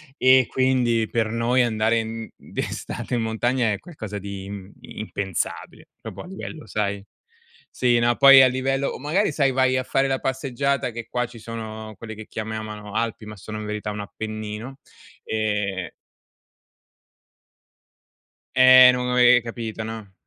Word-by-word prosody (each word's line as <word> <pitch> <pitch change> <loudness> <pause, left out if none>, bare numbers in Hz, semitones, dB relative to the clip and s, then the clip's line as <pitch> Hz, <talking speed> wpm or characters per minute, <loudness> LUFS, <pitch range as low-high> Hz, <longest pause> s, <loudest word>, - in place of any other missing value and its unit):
e 130 -2 +5
quindi 125 -4 +1
per 110 -2 0
noi 115 +2 +1
andare 115 -1 +2
in 115 0 -5
d'estate 125 - -5
in 115 - 0
montagna 115 +2 0
è - - -4
qualcosa 110 - -8
di 100 -1 -7
im 100 -1 -8
impensabile, 100 -4 -5
proprio - - -8
a - - -10
livello, 165 -4 -8
sai 100 -1 -2 0.6
sì, 120 -2 +2
no, 120 0 +2
poi 135 -1 +9
a 130 - +7
livello 135 +2 -1
o - - -5
magari 155 +4 0
sai 140 -3 +2
vai 130 0 +2
a 130 - 0
fare 135 +1 +1
la 135 -1 0
passeggiata 135 0 -1
che 115 0 -7
qua 125 0 -1
ci 120 -1 -12
sono 110 -1 -7
quelli 110 -1 -8
che 110 0 -9
chiamano 110 -1 -6
Alpi, 115 -1 -2
ma 105 0 -9
sono 110 +2 -7
in 105 - -6
verità 105 0 -4
un 105 - -6
Appennino, 110 +4 -6 0.5
ehm 105 -4 -2 2.6
eh 130 0 +9
non 125 0 -2
avevi 125 0 +5
capito, 115 -2 -5
no? 110 -3 -8
115 Hz, 150 wpm, -23 LUFS, 110-130 Hz, 2.6 s, poi